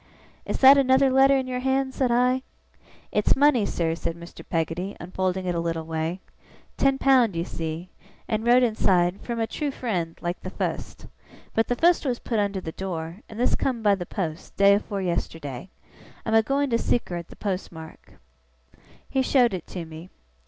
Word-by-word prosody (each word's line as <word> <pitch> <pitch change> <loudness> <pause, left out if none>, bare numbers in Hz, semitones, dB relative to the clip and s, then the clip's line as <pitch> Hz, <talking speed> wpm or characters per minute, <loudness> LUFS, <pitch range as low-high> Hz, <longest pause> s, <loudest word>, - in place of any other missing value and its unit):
'Is - - -1
that 275 +1 +9
another 265 0 +4
letter 270 +1 +5
in 265 - -1
your 250 -1 -3
hand?' 265 +1 0
said 260 -2 0
I. 250 +2 +3 0.7
'It's - - +2
money, 265 -6 +4
sir,' 165 -2 -1
said 165 0 -4
Mr. 170 0 -11
Peggotty, 165 +4 -3
unfolding 185 +1 -2
it 180 - 0
a 170 - -1
little 165 -1 -2
way. 160 +3 -3 0.5
'Ten 275 0 +2
pound, 255 -8 +4
you 165 +1 -1
see. 165 +2 -5 0.4
And 215 0 -1
wrote 245 +2 +5
inside, 190 -5 +2
"From 235 -1 -4
a 225 - +1
true 295 +5 -3
friend," 185 -11 -3
like 175 +1 -3
the 185 - -6
fust. - - -4 0.5
But 225 - +1
the 245 - 0
fust 340 +6 +3
was 255 -4 -1
put 230 -2 -2
underneath 200 -2 -1
the 160 - -3
door, 165 -2 -5
and 215 - -9
this 250 - +2
come 245 -4 -1
by 205 -1 +5
the 180 -3 -3
post, 170 -5 -5
day 200 0 +6
afore 200 -1 -1
yesterday. 165 -4 -4 0.6
I'm 220 - -1
a 225 - +6
going 275 +4 0
to 230 - +2
seek 240 - 0
her 175 - -3
at 170 -1 -7
the - - -13
post 195 -3 -3
mark.' 160 -1 -12 0.9
He 265 - 0
showed 250 -4 +3
it 180 -3 -5
to 175 -3 -6
me. 160 +3 -11
200 Hz, 195 wpm, -25 LUFS, 170-255 Hz, 0.9 s, that